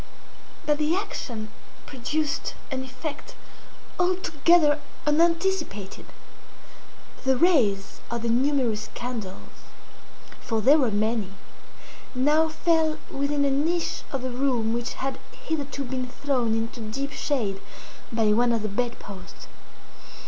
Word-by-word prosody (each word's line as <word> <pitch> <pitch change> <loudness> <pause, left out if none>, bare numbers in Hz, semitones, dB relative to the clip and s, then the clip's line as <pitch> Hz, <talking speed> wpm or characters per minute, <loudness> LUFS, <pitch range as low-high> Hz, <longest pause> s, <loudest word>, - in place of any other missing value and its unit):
But 295 0 +2
the 305 +3 +2
action 235 - -4 0.4
produced 295 +3 -2 0.2
an 260 -1 -2
effect 260 +3 -7 0.6
altogether 340 -4 +4 0.3
unanticipated. 330 - +1 1.2
The 265 -1 +3
rays 240 - +3
of 235 -1 -3
the 235 - 0
numerous 245 -3 +1
candles 230 -6 -4 1.0
(for 225 -2 -1
there 280 +8 +6
were 255 -5 +3
many) 215 -1 0 0.8
now 300 +5 +4
fell 315 -1 +2
within 280 +1 +1
a 280 - +2
niche 325 +5 0
of 270 -2 -3
the 255 - -2
room 245 -3 +1
which 240 +1 -2
had 270 0 -3 0.3
hitherto 285 -3 -2
been 255 -1 -3
thrown 250 -3 0
into 230 +2 -3
deep 270 +6 -3
shade 220 -11 -1 0.5
by 225 -2 +3
one 240 +2 +4
of 230 -2 +1
the 215 - -1
bed 240 +4 -1
posts. 195 -2 -10
260 Hz, 120 wpm, -26 LUFS, 230-295 Hz, 1.2 s, there